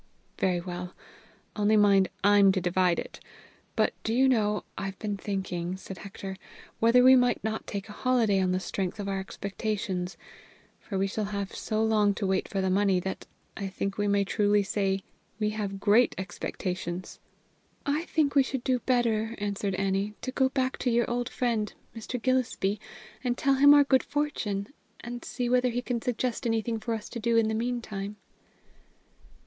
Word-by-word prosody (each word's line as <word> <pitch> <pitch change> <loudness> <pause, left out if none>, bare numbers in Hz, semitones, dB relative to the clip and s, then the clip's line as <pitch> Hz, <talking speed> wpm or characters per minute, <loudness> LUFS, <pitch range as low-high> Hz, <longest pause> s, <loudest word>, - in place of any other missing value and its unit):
"Very 180 -2 +2
well. 180 0 -6 0.6
Only, 210 +1 +3
mind, 200 -2 +5
I'm 200 -1 +6
to 190 - +1
divide 180 0 +2
it. - - -6 0.6
But, - - +2
do 225 - 0
you 265 +2 +5
know, 210 -5 +2
I've 195 0 -5
been 210 -2 -3
thinking," 190 -3 -3
said 190 -1 -9
Hector, 195 -1 -7 0.4
"whether 235 +2 +5
we 260 +1 +9
might 245 -1 +2
not 220 0 -3
take 200 0 -4
a - - -9
holiday 225 -4 +2
on 185 -1 +1
the 185 - +1
strength 190 +1 -3
of 200 - -3
our 195 -1 -1
expectations, 195 -1 -3 0.6
for 200 - -5
we 195 - +2
shall 205 +2 -2
have 200 -1 -4
so 215 0 -1
long 210 -2 +3
to 200 - -2
wait 190 0 0
for 195 - -2
the 190 - +1
money 195 -1 +3
that 190 +1 -5 0.3
I 200 - -4
think 195 +1 -4
we 205 - +1
may 200 0 +3
truly 205 0 +2
say 195 -1 -1 0.4
we 210 -1 +1
have 200 -2 -4
great 215 +4 +4
expectations." 180 -1 -4 0.7
"I 295 +4 0
think 300 -4 +1
we 280 - +6
should 265 -1 -3
do 255 -1 +1
better," 230 -2 +1
answered 200 -1 -2
Annie, 195 +2 -1
"to 255 - -2
go 265 0 +2
back 260 -1 -1
to 250 - 0
your 235 0 +2
old 245 +1 -1
friend, 230 -4 -1 0.2
Mr. 230 +2 -5
Gillespie, 230 -5 0 0.4
and 245 -1 0
tell 275 - +3
him 275 +2 +6
of 290 - +9
our 290 - +7
good 265 -2 +4
fortune, 280 -8 -2 0.3
and 240 0 -6
see 245 0 -3
whether 250 +1 +3
he 245 +1 -2
can 240 -2 -2
suggest 245 +1 -1
anything 225 0 0
for 230 +1 -2
us 220 - -7
to 235 - -5
do 230 +1 +2
in 220 -1 +3
the - - -1
meantime." 220 -3 -3
210 Hz, 185 wpm, -28 LUFS, 195-240 Hz, 0.7 s, we